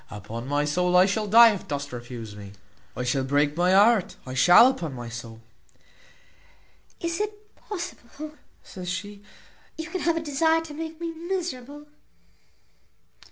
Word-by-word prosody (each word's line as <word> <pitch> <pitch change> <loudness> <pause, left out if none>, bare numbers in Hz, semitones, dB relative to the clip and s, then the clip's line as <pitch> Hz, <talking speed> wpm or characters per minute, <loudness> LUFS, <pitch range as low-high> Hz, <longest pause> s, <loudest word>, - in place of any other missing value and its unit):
Upon 110 +4 -7
my 145 +1 0
soul 180 +4 +2
I 180 - +7
shall 210 +2 -1
die 230 +2 +8
if 200 - -8
dost 145 -1 -4
refuse 120 -3 -8
me; 100 -1 -10 0.4
I 125 - -2
shall 130 +2 0
break 145 +2 +1
my 175 +2 +2
heart, 210 0 +4
I 130 - -7
shall, 175 - +7
upon 250 - 0
my 120 -1 -7
soul." 115 -1 -9 1.6
"Is 335 +3 -2
it 425 0 -6
possible," 310 - -8 0.3
says 180 -1 -8
she, 200 +3 -5 0.6
"you 320 +1 -6
can 370 - -3
have 335 +2 +1
such 330 - -2
a - - -15
desire 320 +3 +2
to 325 -2 -9
make 320 +1 -7
me 335 -1 -3
miserable?" 320 -5 -5
200 Hz, 160 wpm, -25 LUFS, -, 1.6 s, die